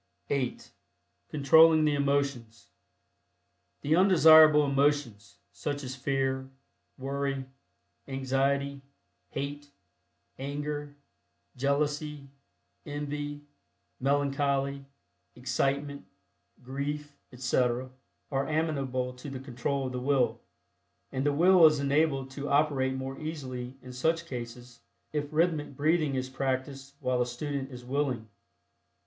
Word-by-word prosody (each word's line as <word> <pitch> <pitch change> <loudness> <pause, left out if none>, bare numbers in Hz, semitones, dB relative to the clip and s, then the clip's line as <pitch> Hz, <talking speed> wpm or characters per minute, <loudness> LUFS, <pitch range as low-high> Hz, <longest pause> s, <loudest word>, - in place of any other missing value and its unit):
(8) 135 -3 -2 0.6
CONTROLLING 155 +2 +6
THE 150 - +3
EMOTIONS. 140 -5 -1 1.1
The 150 +3 +2
undesirable 160 -5 +7
emotions, 140 -7 0
such 145 0 -4
as 130 0 -5
Fear, 135 0 -1 0.5
Worry, 135 0 -2 0.6
Anxiety, 135 +1 0 0.5
Hate, 145 +1 -5 0.7
Anger, 145 +1 -4 0.6
Jealousy, 145 +1 -1 0.5
Envy, 145 0 -4 0.6
Melancholy, 140 0 0 0.5
Excitement, 140 +3 -1 0.6
Grief, 145 +3 -4 0.2
etc., 125 0 0 0.4
are 135 0 0
amenable 135 -5 -1
to 125 +3 -9
the 135 -1 -6
control 135 +1 -2
of 130 - -3
the 125 - -3
Will, 130 -1 +1 0.7
and 130 -1 -2
the - - +4
Will 175 +4 +5
is 155 -2 +2
enabled 140 -1 +1
to 140 +1 -5
operate 140 -3 +2
more 130 0 -5
easily 130 -5 -5
in 125 0 -9
such 165 +6 0
cases 120 -3 -8 0.3
if 145 0 -2
rhythmic 155 -3 +1
breathing 155 -1 +2
is 130 0 -2
practiced 135 +1 -3
while 125 -1 0
the 125 - +2
student 135 +2 -4
is 125 -2 -10
"willing." 130 -4 -1
140 Hz, 105 wpm, -29 LUFS, 130-145 Hz, 1.1 s, undesirable